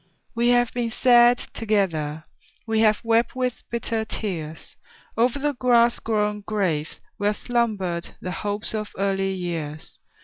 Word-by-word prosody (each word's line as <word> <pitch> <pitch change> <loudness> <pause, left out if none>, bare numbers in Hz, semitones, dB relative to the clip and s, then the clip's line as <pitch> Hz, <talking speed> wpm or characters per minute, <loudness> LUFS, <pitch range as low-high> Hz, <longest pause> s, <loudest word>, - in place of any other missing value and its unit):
We 235 +1 +1
have 245 -1 +3
been 240 -1 -1
sad 240 +1 +5 0.2
together; 165 -9 -1 0.4
We 225 -1 0
have 215 -1 +4
wept 230 +1 +2
with 255 -1 -2
bitter 230 -1 -1
tears 165 -8 -5 0.4
O'er 235 +2 +4
the 285 +3 -2
grass 240 -2 +3
grown 210 -2 0
graves 185 -8 -2 0.2
where 205 +1 +1
slumbered 205 -9 -1
The 180 - -5
hopes 205 +3 -3
of 215 -1 -4
early 195 0 0
years. 165 -5 -5
215 Hz, 135 wpm, -24 LUFS, 190-235 Hz, 0.4 s, sad